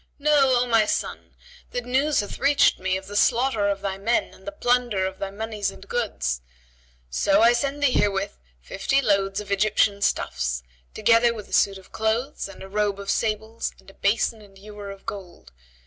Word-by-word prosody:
Know, 280 Hz, -4 st, +4 dB
O -, -, +1 dB
my 225 Hz, -3 st, +3 dB
son, -, -, -3 dB, 0.3 s
that 245 Hz, -1 st, -4 dB
news 270 Hz, +2 st, +2 dB
hath 205 Hz, -, -7 dB
reached 280 Hz, +1 st, +4 dB
me 185 Hz, 0 st, 0 dB
of 190 Hz, -, -9 dB
the 205 Hz, +1 st, -9 dB
slaughter 230 Hz, -1 st, +2 dB
of 200 Hz, -1 st, -2 dB
thy 195 Hz, -1 st, -3 dB
men 230 Hz, +4 st, 0 dB
and 190 Hz, -, -18 dB
the -, -, -2 dB
plunder 245 Hz, -8 st, +1 dB
of 190 Hz, 0 st, -5 dB
thy 195 Hz, -, -3 dB
monies 210 Hz, 0 st, -3 dB
and 200 Hz, -, -12 dB
goods; 65 Hz, -, -2 dB, 0.7 s
so 195 Hz, -, +3 dB
I 235 Hz, +1 st, +7 dB
send 280 Hz, +3 st, -1 dB
thee 275 Hz, -, +4 dB
herewith 200 Hz, -4 st, 0 dB, 0.2 s
fifty 270 Hz, -, 0 dB
loads 195 Hz, -5 st, +1 dB
of 205 Hz, -1 st, -7 dB
Egyptian 200 Hz, 0 st, +2 dB
stuffs, 60 Hz, -, -1 dB, 0.3 s
together 235 Hz, 0 st, +4 dB
with 210 Hz, -2 st, -9 dB
a -, -, -11 dB
suit 195 Hz, -1 st, +3 dB
of 190 Hz, -, -16 dB
clothes 225 Hz, +6 st, -1 dB
and 195 Hz, -, -11 dB
a -, -, -8 dB
robe 205 Hz, 0 st, -1 dB
of 200 Hz, 0 st, -2 dB
sables 220 Hz, +1 st, -2 dB
and -, -, -16 dB
a -, -, -25 dB
basin 215 Hz, +2 st, 0 dB
and 200 Hz, -2 st, -17 dB
ewer 205 Hz, 0 st, -9 dB
of 195 Hz, 0 st, -10 dB
gold. 180 Hz, -, -8 dB
210 Hz, 195 wpm, -24 LUFS, 195-240 Hz, 0.7 s, I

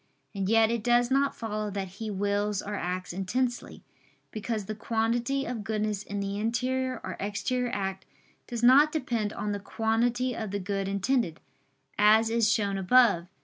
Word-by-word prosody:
And 195 Hz, -2 st, -2 dB
yet 225 Hz, 0 st, +4 dB
it 235 Hz, -2 st, -2 dB
does 240 Hz, +1 st, +3 dB
not 275 Hz, +1 st, +2 dB
follow 215 Hz, -2 st, -3 dB
that 195 Hz, -1 st, -4 dB
he 220 Hz, -1 st, -4 dB
wills 205 Hz, 0 st, -1 dB
or 210 Hz, -, -5 dB
acts 180 Hz, -2 st, -3 dB
intensely; 240 Hz, +7 st, -2 dB, 0.5 s
because 215 Hz, -1 st, -3 dB
the 215 Hz, -, -4 dB
quantity 235 Hz, +5 st, -1 dB
of 235 Hz, -3 st, -4 dB
goodness 215 Hz, -1 st, -1 dB
in 205 Hz, -1 st, -5 dB
the 200 Hz, +1 st, -3 dB
interior 255 Hz, +3 st, -1 dB
or 185 Hz, -1 st, -5 dB
exterior 245 Hz, +5 st, -1 dB
act 195 Hz, -1 st, -3 dB, 0.4 s
does 240 Hz, -1 st, -5 dB
not 280 Hz, +5 st, +7 dB
depend 235 Hz, -9 st, -1 dB
on 210 Hz, -1 st, -3 dB
the 205 Hz, -, -2 dB
quantity 235 Hz, +4 st, 0 dB
of 220 Hz, -2 st, -4 dB
the 200 Hz, +1 st, -3 dB
good 195 Hz, 0 st, -2 dB
intended, 200 Hz, -2 st, 0 dB, 0.6 s
as 220 Hz, +2 st, +5 dB
is 230 Hz, -1 st, +3 dB
shown 200 Hz, -3 st, 0 dB
above. 195 Hz, -4 st, +4 dB
215 Hz, 165 wpm, -28 LUFS, 200-240 Hz, 0.6 s, not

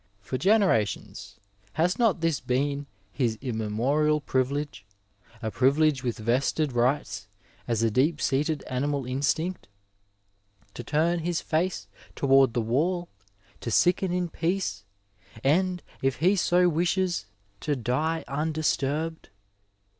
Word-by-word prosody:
*' 100 Hz, -, -40 dB
For 130 Hz, +5 st, -4 dB
generations 190 Hz, -, +1 dB, 0.4 s
has 180 Hz, +6 st, +1 dB
not 220 Hz, -8 st, +2 dB
this 165 Hz, -4 st, +1 dB
been 140 Hz, +2 st, -1 dB, 0.2 s
his 115 Hz, -2 st, -1 dB
immemorial 130 Hz, +6 st, 0 dB
privilege, 135 Hz, -3 st, -2 dB, 0.6 s
a 110 Hz, -, -2 dB
privilege 135 Hz, +4 st, +2 dB
with 120 Hz, -2 st, -2 dB
vested 130 Hz, +5 st, 0 dB
rights 120 Hz, -5 st, 0 dB, 0.4 s
as 115 Hz, -2 st, 0 dB
a 115 Hz, -, +2 dB
deep 145 Hz, +7 st, +2 dB
seated 150 Hz, +2 st, 0 dB
animal 140 Hz, +1 st, -2 dB
instinct— 145 Hz, +8 st, -1 dB, 1.1 s
to 120 Hz, -, -7 dB
torn 165 Hz, +5 st, +1 dB
his 170 Hz, 0 st, -1 dB
face 160 Hz, -, -1 dB, 0.3 s
toward 135 Hz, -3 st, +4 dB
the 120 Hz, -, +2 dB
wall, 170 Hz, +10 st, 0 dB, 0.5 s
to -, -, -5 dB
sicken 180 Hz, -, +3 dB
in 180 Hz, 0 st, 0 dB
peace, 165 Hz, -, -2 dB, 0.6 s
and, 180 Hz, +5 st, +2 dB, 0.2 s
if 135 Hz, -1 st, +1 dB
he 180 Hz, +9 st, +3 dB
so 180 Hz, -1 st, +3 dB
wishes, 175 Hz, -, 0 dB, 0.3 s
to 145 Hz, +4 st, -1 dB
die 145 Hz, +7 st, -1 dB
undisturbed 155 Hz, +1 st, -1 dB
145 Hz, 120 wpm, -27 LUFS, 125-170 Hz, 1.1 s, toward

